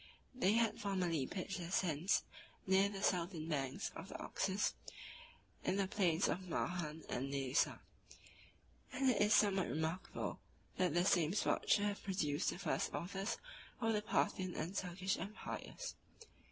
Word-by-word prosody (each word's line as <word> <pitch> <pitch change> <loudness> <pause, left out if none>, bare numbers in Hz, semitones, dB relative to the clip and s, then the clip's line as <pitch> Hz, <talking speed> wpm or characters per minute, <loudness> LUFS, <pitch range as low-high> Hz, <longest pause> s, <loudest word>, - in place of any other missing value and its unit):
They 215 -6 +3
had 225 -1 +2
formerly 180 -8 0
pitched 190 0 -4
their 170 -1 -5
tents 175 0 +2 0.4
near 190 +1 +4
the 200 -1 -5
southern 170 -3 0
banks 135 -5 -1
of - - -7
the - - -5
Oxus, 195 +1 0 0.9
in - - +1
the 195 -1 +1
plains 180 -4 +2
of 185 0 -2
Mahan 160 -2 -2
and 135 +2 -2
Nesa; 135 -1 +1 1.1
and 260 0 +3
it 235 - +1
is 210 0 +4
somewhat 195 -4 +5
remarkable, 160 +4 -2 0.4
that 180 -3 +2
the 175 +1 +4
same 170 -3 +4
spot - - +1
should 205 -1 +5
have 205 0 -1
produced 155 -7 0
the - - -3
first - - 0
authors 195 +5 -2 0.4
of 225 -2 +2
the 210 - +1
Parthian 190 -3 0
and 170 +5 -3
Turkish 185 +1 -1
empires. 215 - -5
185 Hz, 150 wpm, -38 LUFS, 165-200 Hz, 1.1 s, somewhat